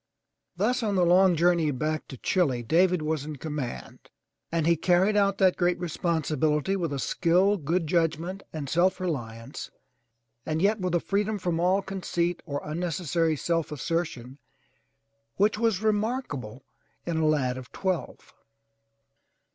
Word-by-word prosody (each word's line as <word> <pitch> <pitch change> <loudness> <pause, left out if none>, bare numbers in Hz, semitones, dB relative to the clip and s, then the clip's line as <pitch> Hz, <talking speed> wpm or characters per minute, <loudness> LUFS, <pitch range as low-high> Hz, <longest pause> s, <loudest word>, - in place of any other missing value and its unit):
Thus 245 +7 +1
on 210 -3 0
the 180 -2 +3
long 180 0 +5
voyage 165 -4 +2
back 155 +3 -2
to 130 - -9
Chile, 135 -6 +1
David 175 +5 +3
was 155 -2 -1
in 155 0 -6
command 140 - -6 0.4
and 165 -2 0
he 170 +1 +4
carried 180 +5 +2
out 200 -1 +3
that 190 -2 +4
great 175 0 +2
re 175 - -3
sponsibility 155 +1 0
with 170 -5 -2
a 140 - -2
skill, 180 +8 +2
good 170 0 -1
judgment 170 +3 0
and 150 -3 -5
self 175 +6 +2
reliance, 120 -8 -5 0.7
and 155 +3 -2
yet 205 +4 +2
with 180 -2 -1
a - - +3
freedom 205 +4 -1
from 175 -3 -1
all 185 +3 +2
conceit 175 -2 -2
or 145 -2 -3
unnecessary 165 0 -1
self 165 +1 -1
assertion 150 -4 -3 1.0
which 210 +2 +2
was 220 -3 +1
remarkable 210 - -2 0.4
in 170 -2 -2
a 160 - +1
lad 135 -5 +1
of 130 -1 -9
twelve. 185 -3 -3
170 Hz, 145 wpm, -27 LUFS, 150-185 Hz, 1.0 s, long